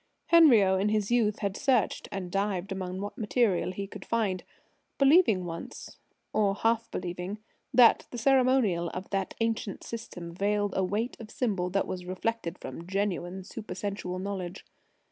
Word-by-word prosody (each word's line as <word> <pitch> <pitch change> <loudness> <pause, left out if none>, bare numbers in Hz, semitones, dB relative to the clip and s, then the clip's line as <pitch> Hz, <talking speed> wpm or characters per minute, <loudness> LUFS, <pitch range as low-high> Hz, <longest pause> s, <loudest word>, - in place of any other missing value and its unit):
Henriot, 225 - +6
in 205 - +2
his 210 0 0
youth, 225 -3 +2
had 200 -1 -1
searched 260 -5 +1
and 185 -2 -5
dived 195 -1 -1
among 185 0 -4
what 205 - -6
material 210 -5 +1
he 195 +2 -4
could 195 -1 -10
find, 210 -5 -1 0.5
believing 275 - +5
once 165 -1 -8 0.3
or 200 -2 +2
half 230 +1 +1
believing 180 +3 -4 0.3
that 245 -3 +6
the 245 - -7
ceremonial 250 -9 +3
of 185 +1 -5
that 195 -1 -2
ancient 225 -3 -1
system 180 -7 -7
veiled 205 +2 0
a 190 - +2
weight 210 +6 -1
of 225 -2 -9
symbol 195 -9 -1
that 195 +2 0
was 180 -1 -5
reflected 185 -1 -2
from 165 +6 -8
genuine 190 -1 -2
supersensual 200 -3 -5
knowledge. 185 -2 -5
200 Hz, 150 wpm, -29 LUFS, 185-225 Hz, 0.5 s, Henriot